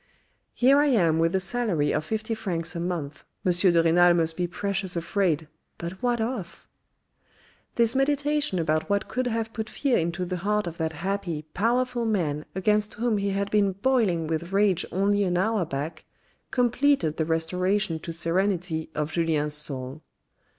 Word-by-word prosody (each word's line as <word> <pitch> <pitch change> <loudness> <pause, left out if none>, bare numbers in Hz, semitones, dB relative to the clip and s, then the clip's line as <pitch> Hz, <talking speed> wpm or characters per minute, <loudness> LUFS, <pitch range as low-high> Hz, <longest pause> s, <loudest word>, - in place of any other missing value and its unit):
" - - -44
Here 270 +3 +5
I 295 - +4
am 170 - +3
with 165 +2 +2
a - - +3
salary 190 -8 0
of - - 0
fifty 220 +6 -3
francs 175 -6 -3
a - - -2
month, 170 -5 -4 0.2
M. 185 - +4
de 175 -1 +4
Renal 175 +1 +5
must 165 -1 +1
be 180 0 -1
precious 195 +1 -2
afraid, 170 -2 0 0.3
but 170 +2 -7
what 245 -1 +1
of? 220 -6 -4 0.5
" - - -34
This 235 0 +3
meditation 290 -3 +1
about 155 +1 0
what 200 0 0
could 255 0 -2
have 225 -1 -2
put 220 -2 -4
fear 275 -4 +1
into 170 +2 -2
the 180 0 -3
heart 210 +3 0
of 170 -1 -6
that 160 0 -1
happy, 175 -2 -3
powerful 240 +3 0
man 155 -8 -1
against 210 +2 +1
whom 225 -1 0
he 200 0 -1
had 200 +1 -2
been 200 -2 +3
boiling 200 -6 +1
with 165 +3 -3
rage 195 -3 +2
only 200 +2 +2
an 180 -2 0
hour 210 0 +1
back, 155 +2 -5 0.5
completed 250 - +2
the 160 - 0
restoration 175 +2 0
to 165 - -6
serenity 170 -1 -1
of 150 0 -2
Julien's 155 -3 0
soul. 135 -1 -2
185 Hz, 170 wpm, -26 LUFS, 165-220 Hz, 0.5 s, Here